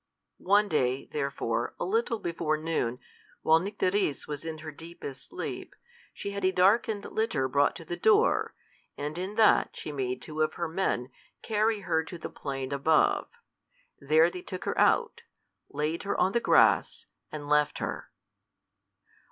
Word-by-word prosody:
One 205 +2 +3
day, 130 -5 0
therefore, 140 -2 -2
a - - -1
little 400 - 0
before 165 -5 -1
noon, 155 -7 -1 0.5
while 160 +1 +5
Nycteris 190 -4 -1
was 145 0 -5
in 160 -1 -5
her 155 - -5
deepest 160 -4 -10
sleep, 360 - -6 0.4
she 200 - -6
had 200 0 -5
a 185 - +3
darkened 205 +3 +2
litter 160 -12 0
brought 140 +2 +2
to 165 - -9
the 175 - -3
door, 440 +2 +3 0.4
and 150 +1 -4
in 185 +4 -4
that 220 -1 +4
she - - -5
made 130 -3 -2
two 155 0 -5
of 155 - +1
her 170 - -2
men 160 -7 -1 0.3
carry 215 -1 +1
her 160 -4 0
to 175 - -8
the 165 - -7
plain 135 -1 -5
above. 150 +3 +2 0.7
There 155 +4 +4
they 180 - -7
took 185 0 -7
her - - -1
out, - - +3 0.5
laid 150 +3 -2
her 200 - -2
on 185 - +3
the 235 - +2
grass, - - +3 0.3
and 150 -1 -6
left 150 0 +2
her. - - -5
165 Hz, 160 wpm, -28 LUFS, 145-200 Hz, 0.7 s, while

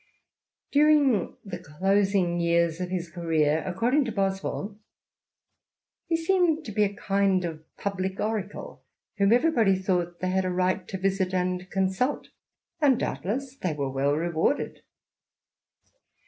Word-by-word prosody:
During 290 - +3
the 180 -3 -6
closing 190 +2 +1
years 170 0 +1
of 180 - -3
his 180 -2 -3
career, 160 -3 +1
according 240 +10 +1
to 235 - -3
Boswell, 195 +1 -2 0.6
" - - -59
he 330 - +2
seemed 330 -2 +1
to 215 - -6
be 210 +1 +2
a 200 - +1
kind 195 -2 +1
of 160 -2 -5 0.2
public 190 -1 -3
oracle, 210 -2 -4 0.4
whom 200 +1 +4
everybody 235 -6 +4
thought 175 -2 -1
they 185 0 -1
had 190 0 +1
a 185 - -1
right 185 +1 0
to 190 - -4
visit 190 -1 0
and 180 0 -1
consult; 190 +8 -1 0.5
and, 275 -4 +4
doubtless, 260 +7 -3
they 180 - -2
were 140 -2 -3
well 140 +2 +1
rewarded." 170 - -1
190 Hz, 135 wpm, -26 LUFS, 175-215 Hz, 0.6 s, whom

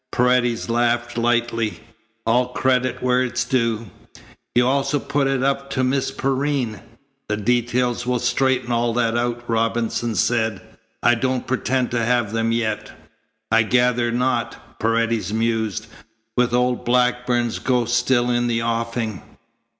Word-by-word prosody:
Paredes 125 -1 +2
laughed 120 0 0
lightly. 120 -2 0 0.5
"All 125 +2 +3
credit 130 -1 0
where 125 0 +3
it 125 -2 -2
is 125 - +1
due. 115 -5 -1 0.6
You 120 0 +4
also 140 +2 +1
put 140 0 0
it 135 -1 0
up 140 0 0
to 130 - 0
Miss 130 +1 +1
Perrine." 135 -5 -1 0.5
"The 105 - 0
details 120 +2 0
will 125 0 +1
straighten 125 0 +1
all 120 0 +1
that 115 -1 +1
out," 120 0 -1
Robinson 115 0 0
said. 110 -4 +1 0.4
"I 120 - +5
don't 130 +2 -1
pretend 130 0 0
to 120 -1 0
have 120 -2 +1
them 115 0 0
yet." 110 -2 -2 0.6
"I 115 - +5
gather 120 +1 +2
not," 125 +2 -2
Paredes 115 -1 0
mused, 110 -1 -1 0.5
"with 125 -1 +2
old 125 0 +1
Blackburn's 125 -1 +1
ghost 120 -2 +1
still 125 -1 +2
in 120 0 +1
the 115 -1 0
offing." 115 -3 -2
120 Hz, 140 wpm, -21 LUFS, 115-125 Hz, 0.6 s, I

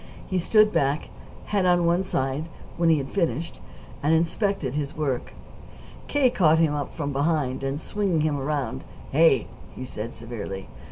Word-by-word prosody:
He 185 - -1
stood 215 +4 +4
back, 140 +2 +1 0.4
head 200 -2 +1
on 175 -1 +4
one 170 +2 +3
side, 135 -5 -1 0.3
when 170 -1 +2
he 160 - +5
had 135 -2 -4
finished, 170 -3 -1 0.4
and 155 +3 +3
inspected 165 - 0
his 145 -1 -3
work. 135 -5 -2 0.7
K. 275 -4 +3
caught 160 -8 +4
him 160 -2 +3
up 145 -1 -4
from 145 -3 -3
behind, 140 -3 0
and, 135 +2 -2
swinging 190 -2 0
him 150 -2 0
around 140 - -2 0.3
"Hey!" 145 -5 +5 0.3
he 130 - -6
said 115 -1 -6
severely. 105 -5 -6
155 Hz, 160 wpm, -25 LUFS, 135-170 Hz, 0.7 s, he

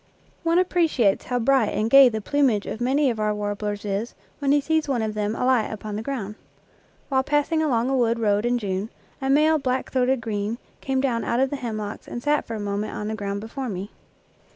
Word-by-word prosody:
One 335 0 +2
appreciates 330 - +2
how 250 - -1
bright 245 -1 +3
and 215 - +1
gay 275 +2 +8
the 220 -2 -4
plumage 255 -4 +1
of 225 - -5
many 265 +2 +2
of 225 - -5
our 210 0 0
warblers 205 0 -3
is 205 +3 -3 0.2
when 280 -2 +1
he 290 - +5
sees 315 +1 0
one 245 -5 +1
of 215 -1 -2
them 210 +1 -1
alight 250 -3 +2
upon 215 -1 -6
the 215 - -3
ground. 225 -5 -4 0.8
While 265 -2 +3
passing 295 +3 +1
along 250 -6 +1
a 270 - +1
wood 235 -2 +2
road 210 -2 +1
in 245 +1 +1
June, 200 -1 -3 0.3
a 270 - -1
male 305 +3 +4
black 260 -1 -2
throated 260 0 +2
green 215 0 -3 0.2
came 265 -1 0
down 245 -4 0
out 235 - 0
of 265 0 +2
the - - -1
hemlocks 215 -4 -5
and 240 - -6
sat 295 0 +1
for 230 - -4
a - - -4
moment 205 +1 -3
on 210 - -4
the - - -2
ground 200 -1 -4
before 250 +4 -5
me. 195 +1 -5
235 Hz, 220 wpm, -24 LUFS, 210-270 Hz, 0.8 s, gay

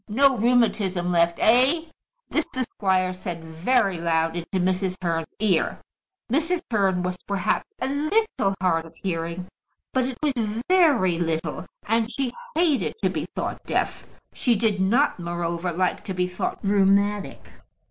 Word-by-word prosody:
No 270 +5 +4
rheumatism 215 -6 +2
left, 170 0 +3
eh?" 260 +8 +4 0.4
This 315 - -1
the 255 - -2
squire 185 -5 0
said 175 -2 -6
very 185 +4 +1
loud 165 -1 +1
into 175 +2 -3
Mrs. 185 +1 0
Hearn's 165 -3 -1
ear. 200 -6 +1 0.5
Mrs. 330 +6 +1
Hearn 190 -4 +2
was 180 0 -2
perhaps 200 - 0
a 260 - -1
little 295 - 0
hard 165 -3 +1
of - - -17
hearing; 170 -1 -3 0.5
but 260 -1 +2
it 260 -1 -4
was 295 -2 +2 0.3
very 285 - +4
little, 160 -2 -2 0.2
and 225 +1 +1
she 255 -1 -2 0.2
hated 320 -5 +2
to - - +3
be - - -3
thought - - -5
deaf. - - -2 0.3
She 240 -3 +2
did 210 -2 +1
not, 235 +6 +2
moreover, 170 0 -2
like 180 +2 -1
to 190 - -4
be 180 0 +1
thought 180 - -3
rheumatic. 200 0 +2
195 Hz, 145 wpm, -24 LUFS, 175-245 Hz, 0.5 s, No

